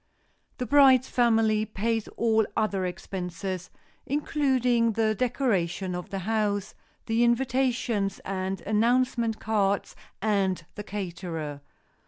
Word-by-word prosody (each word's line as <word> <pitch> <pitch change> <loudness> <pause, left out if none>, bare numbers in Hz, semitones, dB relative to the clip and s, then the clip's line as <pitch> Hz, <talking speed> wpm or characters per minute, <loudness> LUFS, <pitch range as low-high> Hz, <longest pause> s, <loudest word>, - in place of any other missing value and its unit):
The 250 - -2
bride's 265 -2 +6
family 225 -3 +3
pays 225 +1 -2
all 220 -1 +3
other 200 -4 0
expenses, 180 0 -5 0.4
including 255 -5 +1
the 220 0 +2
decorating 195 -7 0
of 180 0 -5
the 195 - -4
house, 210 -2 0 0.3
the 225 +1 +2
invitations 235 -4 +1
and 190 -1 -3
announcement 235 +1 +1
cards 200 -2 0 0.2
and 195 -5 0
the 210 - -7
caterer. 170 -7 -5
215 Hz, 105 wpm, -27 LUFS, 195-235 Hz, 0.4 s, bride's